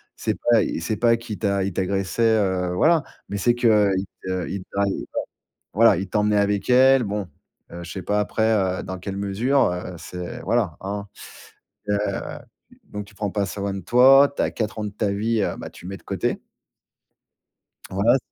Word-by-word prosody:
C'est - - -2
pas 120 -2 +3 0.2
c'est 105 +5 -2
pas 115 +2 +4
qui 115 -3 -7
t'a 100 -2 0
il 100 - -3
t'agressait, 100 +5 +1
heu, 95 -3 0
voilà, 160 - +3 0.3
mais 100 - -4
c'est 120 +4 +3
qu'il 120 -1 +3 0.5
te 95 -2 -3
il 100 - -4
te 100 - -12 1.0
voilà, 110 +1 +6
il 95 +2 -3
t'emmenait 105 0 +2
avec 100 0 0
elle. 130 0 +6
Bon, 100 -2 -3 0.4
heu, 85 +1 -7
je 85 - -8
sais 95 - -5
pas 105 0 0
après, 105 +1 -1 0.4
heu, - - -9
dans 95 - -5
quelle 95 +1 -5
mesure, 110 +8 +1
heu, 90 0 -5
c'est 90 -1 -7
voilà, 110 -6 0
hein. 100 +1 -4 0.8
Heu, 105 - +2 0.9
donc 105 0 -7
tu 100 - -19
prends 105 -1 -3
pas 100 -2 0
soin 100 +1 -3
de 95 - -4
toi, 135 +8 +6
tu - - -2
as - - -1
4 110 -1 -3
ans - - -2
de - - -3
ta 105 0 -1
vie, 110 +2 0
heu, - - -1
bah, - - -7
tu 90 - -12
mets 95 +1 -6
de - - -23
côté. - - -2 1.5
Voila. 100 +7 +3
100 Hz, 185 wpm, -23 LUFS, 95-115 Hz, 1.5 s, voilà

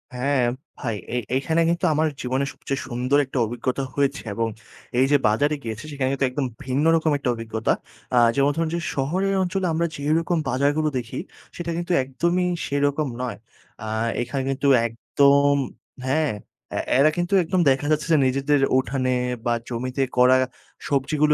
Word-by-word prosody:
হ্যাঁ 135 +1 +1 0.4
ভাই, 115 -3 -2 0.2
এ - - +1 0.2
এখানে 160 +5 +1
কিন্তু 170 +2 0
আমার 155 +1 +2
জীবনের 130 +2 -1
সবচেয়ে 135 0 -4
সুন্দর 125 +3 +1
একটা 135 - -6
অভিজ্ঞতা 125 +4 -2
হয়েছে 140 +1 +1
এবং 115 +2 0 0.5
এই 130 - +5
যে 145 - +6
বাজারে 145 +8 +2
গিয়েছি 110 -1 -5
সেখানে 135 -2 -1
কিন্তু 140 0 +1
একদম 135 +2 -2 0.2
ভিন্ন 135 +4 0
রকম 160 -1 +2
একটা 135 - -2
অভিজ্ঞতা। 110 -1 -1 0.4
আ - - +4 0.2
যেমন 140 +1 +3
ধরুন 165 0 0
যে - - -1
শহরের 180 +9 0
অঞ্চলে 185 +1 -1
আমরা 170 +2 +1
যেরকম 160 +4 0
বাজারগুলো 145 +4 +1
দেখি, 120 -2 -4 0.4
সেটা 170 -1 -4
কিন্তু 175 +1 -3
একদমই 170 +8 0 0.2
সেরকম 145 +1 0
নয়। 125 -1 -3 0.5
আ - - -5 0.3
এখানে 135 +3 -2
কিন্তু 135 +1 0 0.2
একদম 140 +5 +3 0.5
হ্যাঁ 150 +2 +1 0.4
এ্যা - - -1 0.2
এরা 145 +3 +6
কিন্তু 175 +2 -1
একদম 180 +3 0
দেখা 135 +2 +1
যাচ্ছে 155 +1 +1
যে - - +6
নিজেদের 140 +2 +2 0.2
উঠানে 130 -1 0 0.3
বা 120 - +2 0.2
জমিতে 125 +3 -3 0.2
করা 125 +1 +6 0.5
সবজিগুলো 150 +2 +2
140 Hz, 160 wpm, -23 LUFS, 130-155 Hz, 0.5 s, যে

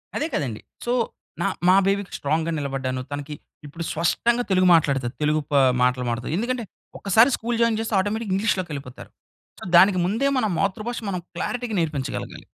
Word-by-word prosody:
అదే 310 - 0
కదండీ. 125 - -2 0.2
సో, 240 - 0 0.5
నా - - +2 0.2
మా 185 - +7
బేబీకి 200 -1 -1
స్ట్రాంగ్‌గా 160 +3 0
నిలబడ్డాను. 135 -2 -3
తనకి 145 +1 -5 0.3
ఇప్పుడు 165 +4 -7
స్పష్టంగా 235 +9 +1
తెలుగు 185 -1 +4
మాట్లాడుతది. 135 -6 +1
తెలుగు 150 +1 +2
ప - - -3 0.3
మాటలు 125 0 +2
మాట్లాడతాది. 120 +6 -2
ఎందుకంటే, 240 +2 -1 0.4
ఒక్కసారి 220 +6 +5
స్కూల్ 235 +1 -2
జాయిన్ 230 -2 +2
చేస్తే 225 -1 -2
ఆటోమేటిక్‌గా 210 +1 -1
ఇంగ్లీష్‌లోకెళ్ళిపోతారు. 175 - -3 0.5
సో, - - -7
దానికి 185 0 +6
ముందే 225 +9 +1
మన 235 - +1
మాతృభాష 210 +5 -2
మనం 180 -2 -3
క్లారిటీగా 240 +4 -3
నేర్పించగలగాలి. 150 -5 -4
185 Hz, 155 wpm, -23 LUFS, 145-220 Hz, 0.5 s, మా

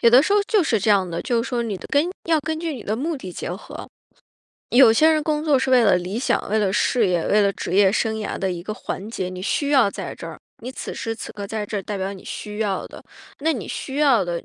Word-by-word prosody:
有 235 - +6
的 250 +4 +7
时 400 - 0
候 415 - +5
就 420 -5 +3
是 230 -8 +1
这 205 - -2
样 195 -3 +4
的， 170 - -3
就 235 -2 0
是 - - -5
说 240 -2 -1
你 215 -4 -3
的 175 - -10
根 295 +5 +2 0.2
要 325 -1 +4
根 315 +2 -3
据 330 -2 -2
你 260 - -8
的 215 - -1
目 310 +7 -2
的 185 -9 -8
结 - - -5
合， 180 +4 -8 0.8
有 245 -1 +7
些 310 +8 +5
人 310 -1 +2
工 305 0 -1
作 290 -4 +4
是 265 0 -1
为 250 -3 +5
了 195 -3 +5
理 185 +5 -3
想， 255 - 0
为 215 +2 +1
了 195 -3 +1
事 215 +1 +2
业， 175 -2 0
为 210 0 +4
了 200 - +2
职 185 - -4
业 195 -1 +5
生 220 0 0
涯 215 -1 -4
的 190 - -1
一 175 -1 -5
个 215 - -4
环 210 0 -6
节， 185 -5 -3
你 185 0 -7
需 285 +7 0
要 265 -8 +4
在 - - -6
这 - - -9
儿， - - -9 0.2
你 255 +2 -6
此 - - -6
时 225 - -3
此 225 - -8
刻 200 -1 -6
在 215 0 -4
这 205 -2 -3
代 205 +1 -4
表 195 +1 -3
你 190 - -13
需 210 0 -6
要 200 -3 -1
的。 - - -12 0.4
那 320 +3 +2
你 235 - -5
需 270 0 -5
要 270 -10 +4
的， 170 -1 -3
220 Hz, 305 characters per minute, -22 LUFS, 195-270 Hz, 0.8 s, 的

